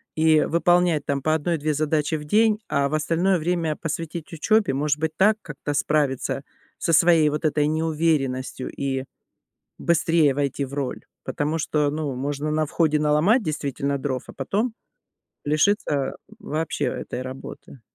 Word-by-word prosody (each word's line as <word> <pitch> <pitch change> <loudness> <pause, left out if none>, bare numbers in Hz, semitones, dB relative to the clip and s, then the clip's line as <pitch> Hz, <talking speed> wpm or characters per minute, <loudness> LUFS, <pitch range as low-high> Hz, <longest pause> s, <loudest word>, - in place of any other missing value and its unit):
и 155 -1 +4
выполнять 175 -2 +2
там 140 -1 -1
по 155 +3 +1
1-2 155 -1 -1
задачи 150 +1 0
в 150 - -5
день, 215 +5 +3
а 140 0 +2
в 155 - -6
остальное 170 +4 +1
время 165 -1 0
посвятить 165 +1 -5
учебе. 210 0 +2
Может 145 +2 0
быть, 160 0 0
так 210 +3 +4
как-то 145 -2 -5
справиться 140 -2 0 0.3
со 165 - 0
своей 165 -1 +5
вот 150 +2 -3
этой 150 -1 +2
неуверенностью 155 -5 -1
и 135 -1 -2 0.8
быстрее 165 -3 +3
войти 140 0 -1
в 135 - -9
роль, 140 -3 -4 0.2
потому 150 +2 -2
что, 150 -2 +1
ну, 150 -2 -3
можно 145 +3 -3
на 155 0 +1
входе 155 0 +1
наломать, 155 - +3
действительно, 140 -4 -2
дров, 130 -2 -3
а - - -8
потом 205 - -1 0.7
лишиться, 155 +8 +2
э, 140 -2 0 0.3
вообще 160 -6 -3
этой 125 - -4
работы. 130 0 -9
155 Hz, 150 wpm, -24 LUFS, 140-165 Hz, 0.8 s, своей